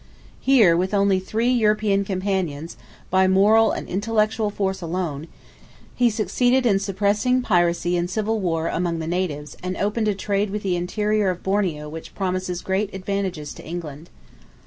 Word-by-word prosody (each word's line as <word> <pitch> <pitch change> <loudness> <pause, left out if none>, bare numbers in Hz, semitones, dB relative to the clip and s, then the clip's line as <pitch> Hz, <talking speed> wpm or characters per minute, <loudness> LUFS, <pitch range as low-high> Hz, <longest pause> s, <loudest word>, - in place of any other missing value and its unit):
Here, 225 -11 +5
with 185 +4 0
only 200 -1 +3
three 225 +6 0
European 210 -4 +2
companions, 185 -5 -2 0.4
by 190 0 +4
moral 210 +4 +5
and - - -4
intellectual 215 +2 0
force 190 -2 -2
alone, 165 -3 -3 0.7
he 245 -1 +3
succeeded 245 +4 +1
in 200 -4 +3
suppressing 205 +6 +1
piracy 175 -3 +2
and 175 0 -1
civil 215 +3 -1
war 165 -4 -1
among 170 -1 -1
the 160 - -4
natives 165 -4 -3
and 185 0 -4
opened 215 +2 0
a 210 - +1
trade 200 +1 -1
with 210 +1 -4
the 185 -2 0
interior 210 +3 0
of 180 -1 -4
Borneo 185 -7 -1
which 160 +2 -9
promises 185 -2 -2
great 195 +2 -1
advantages 190 -6 -3
to - - -12
England. 160 -1 -7
190 Hz, 155 wpm, -23 LUFS, 175-210 Hz, 0.7 s, Here